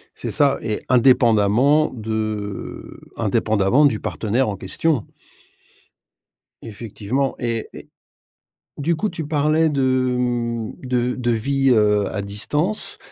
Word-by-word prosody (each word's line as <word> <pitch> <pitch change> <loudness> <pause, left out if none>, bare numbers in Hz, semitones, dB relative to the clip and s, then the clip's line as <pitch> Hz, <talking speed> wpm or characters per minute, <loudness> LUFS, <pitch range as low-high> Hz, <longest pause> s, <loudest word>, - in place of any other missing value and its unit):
C'est - - -5
ça 140 -1 +2
et 110 -2 -3
indépendamment 125 +3 +4
de 110 -3 -5 0.2
indépendamment 110 +7 +2
du 120 -7 +2
partenaire 115 +3 -1
en 100 - -3
question. 150 - -1 1.6
Effectivement 115 +4 -3
et 115 -2 -3
et - - -12 0.9
du 165 +4 0
coup 210 +6 -2
tu 165 -3 -5
parlais 155 +1 +2
de 130 -3 +1
m 120 -2 -2
de 125 -1 -1
de 120 -2 -1
vie, 135 +4 +1
heu, 105 -3 +3
à 100 - -2
distance, 145 - -2
120 Hz, 115 wpm, -21 LUFS, 110-140 Hz, 1.6 s, indépendamment